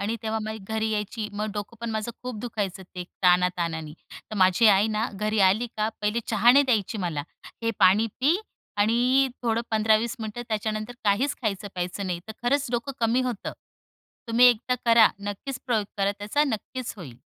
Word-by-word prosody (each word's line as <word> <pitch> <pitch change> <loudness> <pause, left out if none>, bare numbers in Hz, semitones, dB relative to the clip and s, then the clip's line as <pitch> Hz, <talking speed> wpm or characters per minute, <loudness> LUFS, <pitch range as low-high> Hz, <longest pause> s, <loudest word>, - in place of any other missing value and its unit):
आणि 215 +3 -1
तेव्हा 220 0 -1
माझी 220 +1 -5
घरी 220 0 -1
यायची. 210 +1 -3
मग 210 +1 -3
डोकं 205 +2 -6
पण 235 -1 -3
माझं 220 +1 -2
खूप 250 -2 -5
दुखायचं 205 -5 -4
ते 180 -1 -5 0.2
ताणाताणाने, 175 -3 +2 0.4
तर - - -5
माझी 185 +3 +4
आई 205 0 +5
ना 220 +2 -1
घरी 215 +2 -1
आली 215 +6 +1
का 215 0 +1
पहिले 210 +3 0
चहा 220 +2 +5
नाही 285 +2 +6
द्यायची 225 -4 0
मला. 170 -6 -2 0.4
"हे 230 - +1
पाणी 195 +5 +5
पी 295 +7 +4 0.4
आणि 245 +6 +3
अ, - - -7
थोडं 230 -1 +1
15-20 220 +2 +2
मिनिटं 220 +2 -5
त्याच्यानंतर 215 +1 -2
काहीच 230 +8 +2
खायचं 205 -2 -2
प्यायचं 180 +2 -3
नाही." 175 -2 -3
तर - - -5
खरंच 280 +3 +1
डोकं 245 +3 -2
कमी 230 +2 +2
होतं. 245 -5 -3 0.8
तुम्ही 235 +2 +6
एकदा 245 +1 +3
करा. 230 -2 +7
नक्कीच 205 +6 -5
प्रयोग 225 -4 +1
करा. 200 0 +1
त्याचा 210 +9 +1
नक्कीच 255 -1 -4
होईल. 135 - -10
220 Hz, 180 wpm, -26 LUFS, 200-235 Hz, 0.8 s, करा